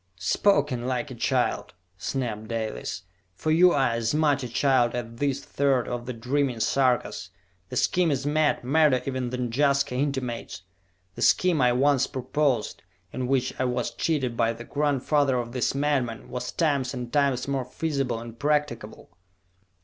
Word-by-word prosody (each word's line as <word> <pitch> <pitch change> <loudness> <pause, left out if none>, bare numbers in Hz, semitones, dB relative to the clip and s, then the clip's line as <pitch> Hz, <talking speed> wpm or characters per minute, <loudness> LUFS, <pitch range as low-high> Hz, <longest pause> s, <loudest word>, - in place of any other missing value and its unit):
"Spoken 130 - +1
like 130 +2 -2
a - - -5
child!" 115 - -1 0.2
snapped 110 +1 -3
Dalis. 110 -5 -4 0.3
"For 155 - -1
you 175 +3 +6
are 135 -5 +2
as 115 +3 -1
much 150 -2 +2
a 125 - -5
child 125 -1 +2
as 120 -1 -2
this 140 -1 -1
third 135 -3 +1
of 120 0 -4
the 125 - -3
dreaming 125 +1 -1
Sarkas! 125 +1 +1 0.4
The - - -6
scheme 180 -2 +2
is 140 -2 -1
mad, 150 -1 +1
madder 140 0 +3
even 130 -2 -2
than 125 -1 -3
Jaska 140 +1 +2
intimates! 125 -7 -3 0.5
The - - -9
scheme 180 -6 +3
I 125 -1 +4
once 140 +1 +3
proposed, 130 -2 -1 0.3
in 130 -1 -3
which 130 -1 +1
I 130 - +1
was 125 -1 -2
cheated 135 -8 -1
by 115 -1 +1
the 115 +1 -9
grandfather 145 -1 +1
of 120 -1 -3
this 125 +2 -1
madman, 135 -5 -1
was 125 - -4
times 140 -6 0
and 125 -1 -6
times 140 -3 +1
more 135 -2 -1
feasible 135 -2 -2
and 115 0 -10
practicable!" 145 - -2
130 Hz, 160 wpm, -26 LUFS, 120-145 Hz, 0.5 s, you